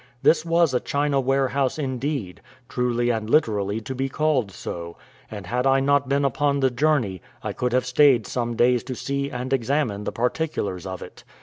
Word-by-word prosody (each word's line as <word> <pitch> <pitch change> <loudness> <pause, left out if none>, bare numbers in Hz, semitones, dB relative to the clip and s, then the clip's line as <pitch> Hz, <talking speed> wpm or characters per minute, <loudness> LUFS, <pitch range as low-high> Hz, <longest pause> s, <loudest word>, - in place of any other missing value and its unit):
This 160 - +4
was 165 -3 +2
a 125 - +2
China 140 +1 0
warehouse 135 +1 +1
indeed, 130 - -3 0.3
truly 120 -1 0
and 110 -2 -3
literally 105 -7 +2
to 120 +5 -5
be 135 +1 -2
called 140 -7 +1
so, 85 -2 -7 0.3
and 105 -3 -7
had 125 +7 0
I 135 0 +4
not 140 0 +2
been 140 0 +2
upon 140 +1 +1
the 135 -1 +2
journey, 125 - +1 0.2
I - - -3
could 125 0 -1
have 125 +1 +1
stayed 130 -3 +4
some 120 +2 -2
days 120 0 +3
to 130 0 -5
see 140 +2 -2
and 125 +1 -4
examine 120 -5 0
the - - -2
particulars 115 - -2
of 95 -1 -6
it. - - -13
130 Hz, 185 wpm, -24 LUFS, 115-140 Hz, 0.3 s, This